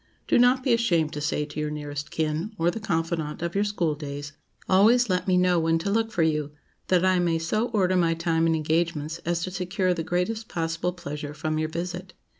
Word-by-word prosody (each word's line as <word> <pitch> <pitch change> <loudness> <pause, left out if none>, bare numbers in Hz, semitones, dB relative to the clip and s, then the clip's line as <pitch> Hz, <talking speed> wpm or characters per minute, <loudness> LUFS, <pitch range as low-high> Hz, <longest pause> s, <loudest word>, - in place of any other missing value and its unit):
Do - - +4
not 250 +1 +4
be 255 - +3
ashamed 170 -10 +2
to 150 - -4
say 150 0 -1
to 145 +1 -7
your 150 0 -1
nearest 145 -1 -5
kin, 160 +7 -2
or 170 +1 +2
the 225 - -5
confidante 165 -4 -2
of 170 0 -2
your 200 - +2
school 180 -7 0
days—"Always 160 +10 +1
let 180 +1 0
me 185 -1 +3
know 180 -1 +3
when 165 0 +2
to 175 +5 -2
look 225 +1 +1
for 170 - +1
you, 150 -2 0 0.3
that 185 0 +3
I 185 -1 +3
may 170 -2 +1
so 215 +8 0
order 185 -3 +2
my 170 -2 +2
time 165 -1 +1
and 165 - +2
engagements 160 0 -1
as 170 -1 0
to 185 - -3
secure 185 0 0
the 170 - -3
greatest 180 +7 -2
possible 165 +1 -2
pleasure 150 -3 -6
from 155 0 -2
your 155 0 -1
visit." 180 +3 -5
170 Hz, 215 wpm, -26 LUFS, 155-185 Hz, 0.3 s, Do